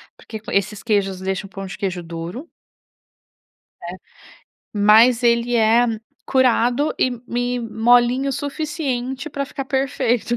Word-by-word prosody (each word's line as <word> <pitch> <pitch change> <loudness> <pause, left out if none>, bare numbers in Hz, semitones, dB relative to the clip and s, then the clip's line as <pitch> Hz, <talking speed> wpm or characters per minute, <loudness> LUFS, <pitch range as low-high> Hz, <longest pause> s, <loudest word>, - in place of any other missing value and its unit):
porque 220 -2 -9
esses 200 +1 -1
queijos 200 -4 0
deixam 190 +1 -3
o - - -23
pão 195 0 -7
de 190 - -8
queijo 185 -3 -3
duro. 170 - -7 1.3
Né. 175 +2 -7 0.8
Mas 220 +4 +5
ele 235 0 +2
é 230 +2 +4 0.4
curado 255 +2 +2
e 255 - +2 0.2
e 245 +1 -1
molinho 240 +4 +2
suficiente 280 -2 -3
pra 280 0 -3
ficar 275 0 -6
perfeito. 255 -3 0
240 Hz, 120 wpm, -20 LUFS, 205-260 Hz, 1.3 s, Mas